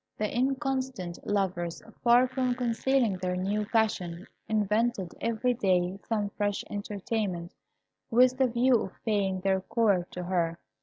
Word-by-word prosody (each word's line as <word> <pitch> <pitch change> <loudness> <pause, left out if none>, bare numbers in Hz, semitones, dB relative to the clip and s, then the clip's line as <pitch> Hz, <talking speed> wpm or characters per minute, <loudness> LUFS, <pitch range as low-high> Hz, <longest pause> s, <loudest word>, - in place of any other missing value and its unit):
The 215 +1 -2
inconstant 260 -8 -1
lovers, 185 -4 -1 0.2
far 245 +1 +6
from 255 -1 0
concealing 245 -3 +1
their 180 0 -2
new 200 +3 -1
passion, 195 -6 0 0.2
invented 210 -2 +1
every 230 +2 +1
day 185 -4 +1
some 210 -3 -1
fresh 205 -1 -1
entertainment, 200 -3 -3 0.6
with 255 +2 +4
the 260 - +5
view 240 0 +3
of 190 - -5
paying 195 -4 0
their 190 0 +1
court 195 -4 +1
to 180 - -4
her. 170 -2 0
210 Hz, 135 wpm, -29 LUFS, 185-240 Hz, 0.6 s, far